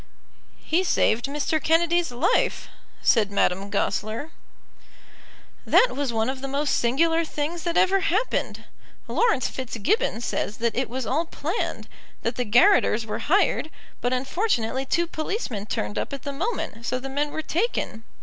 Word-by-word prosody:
"He 345 +4 0
saved 240 -9 +2
Mr. 295 +2 -1
Kennedy's 335 -1 +2
life," 245 +8 +1 0.3
said 215 -4 +4
Madame 195 0 +1
Goesler. 220 +10 -2 1.3
"That - - +5
was 280 -2 -1
one 225 -1 0
of 260 0 -3
the 275 - -3
most 280 +2 0
singular 325 +8 +2
things 315 +2 -3
that 340 0 0
ever 385 +1 +4
happened. 395 +5 -1 0.4
Laurence 445 - +2
Fitzgibbon 260 - -1
says 215 -2 -2
that 235 -1 -1
it 255 -2 -1
was 255 +1 -3
all 305 +8 0
planned, 330 +5 -3 0.4
that 230 +1 -1
the 250 - -1
garotters 235 - +4
were 215 - -4
hired, 370 -3 +3 0.3
but 245 - 0
unfortunately 265 - 0
two 340 +4 +2
policemen 310 - -4
turned 105 - -2
up - - -4
at 275 - -6
the 280 - -4
moment, 290 - -3
so 255 +2 -1
the 260 +1 -6
men 285 +2 -1
were 315 +2 -4
taken. 335 - -2
280 Hz, 150 wpm, -25 LUFS, 235-335 Hz, 1.3 s, That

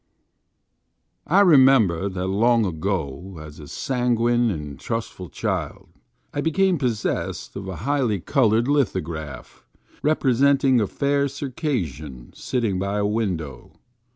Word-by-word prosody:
IKEMEMBEK 130 - +5
that 90 0 -2
long 115 +4 +3
ago, 90 -1 -3
as 75 -1 -11
a 75 - -10
sanguine 120 - +1
and 75 -7 -5
trustful 115 -6 -5
child, - - -4 0.4
I 145 - -1
became 180 +2 +2
possessed 110 - -2
of 95 -1 -6
a 95 - -5
highly 130 -8 +1
colored 115 - +2
lithograph, 85 - -2 0.4
representing 135 -3 +3
a 105 - 0
fair 140 +3 0
Circassian 115 - -4
sitting 115 -7 -2
by 100 +2 -2
a 105 - +1
window. 90 - -3
110 Hz, 110 wpm, -23 LUFS, 90-135 Hz, 0.4 s, IKEMEMBEK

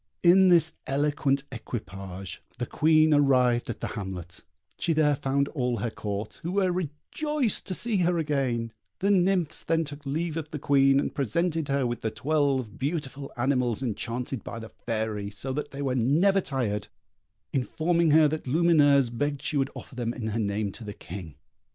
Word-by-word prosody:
In 185 +2 +7
this 170 -3 +5
elegant 140 0 +1
equipage 95 -6 -6 0.2
the - - -2
Queen 155 0 +4
arrived 125 -4 +3
at - - -5
the - - -2
hamlet; 95 -5 -6 0.4
she 165 - +1
there 150 -2 +3
found 140 +1 0
all 125 -5 -1
her 115 +2 -2
Court, 105 0 -5
who 170 +3 -3
were 190 -2 +2
rejoiced 210 - -1
to 185 - -1
see 230 0 +2
her 175 -1 +2
again; 130 -7 -1 0.2
the 200 +2 +1
nymphs 185 -4 +2
then 165 0 +1
took 145 -1 -8
leave 155 +3 -2
of 155 -2 -4
the 155 - -5
Queen, 135 -1 +4
and - - -2
presented 160 - 0
her 140 -1 +1
with 120 0 -3
the 110 - -1
twelve 140 -4 0
beautiful 140 -1 -3
animals 125 -1 +1
enchanted 120 +1 -3
by - - -6
the 110 -1 -8
Fairy, 110 -3 -3
so 130 +6 -4
that 150 +1 -3
they 140 +1 -5
were 135 -2 0
never 160 - +3
tired, 105 - -2 0.7
informing 165 +5 +1
her 155 0 +6
that 155 -1 -4
Lumineuse 145 -4 +4
begged 145 +3 -2
she - - -2
would 135 0 +1
offer - - -10
them 120 -1 -3
in 110 -3 -3
her 110 +2 -2
name 100 -1 -1
to 115 - -10
the 105 -1 -6
King. 85 -3 -8
140 Hz, 175 wpm, -27 LUFS, 120-155 Hz, 0.7 s, In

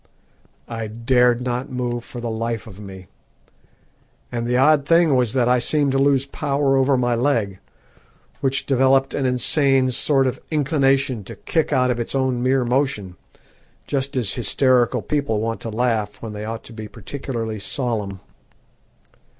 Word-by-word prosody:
I 115 -2 -5
dared 120 +2 +2
not 125 +1 -3
move 120 -1 -3
for 120 - -9
the 120 -1 -4
life 115 -1 -3
of 100 -3 -12
me, 95 -2 -10 1.3
and 120 -1 -3
the 125 +1 +1
odd 145 +1 +4
thing 165 -3 +4
was 125 -3 +1
that 125 -3 +2
I 125 0 +3
seemed 145 +3 +2
to 135 - +1
lose 135 -1 +3
power 140 -1 0
over 135 0 +3
my 120 -1 +1
leg, 115 -6 0 0.8
which 135 0 -1
developed 135 0 +3
an 135 -2 0
insane 130 +1 +3
sort 135 +2 +2
of 130 - -2
inclination 135 -5 +1
to 115 - -8
kick 160 +10 -1
out 125 -3 +2
of 120 - -2
its 120 - -3
own 130 -2 0
mere 130 0 +2
motion 125 -8 -1 0.7
just 135 -1 -2
as 105 -6 0
hysterical 125 +1 +2
people 140 -8 -1
want 115 +1 -3
to 115 - -5
laugh 110 -3 -1
when 110 -2 -7
they 105 0 -6
ought 115 +1 -5
to 115 - -12
be 110 -1 -7
particularly 115 -1 -5
solemn. 105 -5 -3
125 Hz, 160 wpm, -21 LUFS, 115-135 Hz, 1.3 s, odd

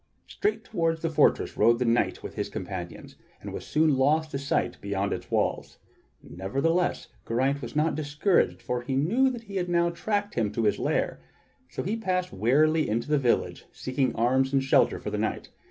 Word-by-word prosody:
Straight 415 +1 -2
toward 165 -5 -1
the 165 - 0
fortress 155 - +2
rode 115 0 +4
the 125 - -1
knight 115 +1 +1
with - - -7
his - - -3
companions, - - -7 0.2
and - - -8
was - - -6
soon 155 -3 +3
lost 155 +4 +2
to 135 - -3
sight 140 0 -1
behind 100 0 -1
its - - -6
walls. - - -1 0.5
Nevertheless, 140 - -1 0.2
Geraint 135 +5 0
was 120 +2 -7
not 155 +2 +2
discouraged, 155 +5 +1
for 125 0 -2
he 130 +2 -3
knew 220 - +3
that 240 -3 -6
he 200 -3 -6
had 180 -1 -1
now 170 0 +2
tracked 205 +4 -2
him 110 -4 0
to 115 - -1
his 105 - +1
lair; - - -1 0.5
so - - -4
he 200 +5 -1
passed 185 -4 -2
wearily 150 +10 +2
into 115 +6 -1
the 150 -1 +3
village 125 -3 0
seeking 130 0 -1
arms 130 +3 +2
and 135 -1 +2
shelter 135 - +3
for - - -6
the - - -2
night. - - -2
145 Hz, 190 wpm, -27 LUFS, 125-170 Hz, 0.5 s, rode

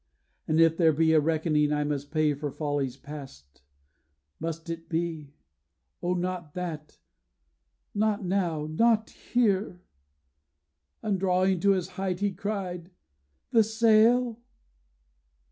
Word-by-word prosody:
And 155 +1 +2
if 165 0 +5
there 160 -3 +4
be 160 +2 +3
A 155 - +6
reckoning 155 -1 +1
I 150 0 +1
must 145 -1 -3
pay 155 -1 +2
for 145 +1 -4
follies 140 -3 -2
past, 135 - -11 0.8
Must 165 +1 -5
it 165 0 -6
be 160 -4 -3 0.7
O 180 +1 0
not 180 -4 -4
that, 165 -4 -6 1.0
not 210 -1 0
now, 175 -5 0
not 220 +8 +2
here!' 200 -6 0 1.2
And 200 -3 0
drawing 185 0 +2
to 200 +2 +4
his 185 -1 -2
height, 185 -2 -1
he 205 0 +1
cried: 185 -3 -4 0.6
'The 225 -2 +5
sail? 225 +2 +3
170 Hz, 120 wpm, -27 LUFS, 150-195 Hz, 1.2 s, A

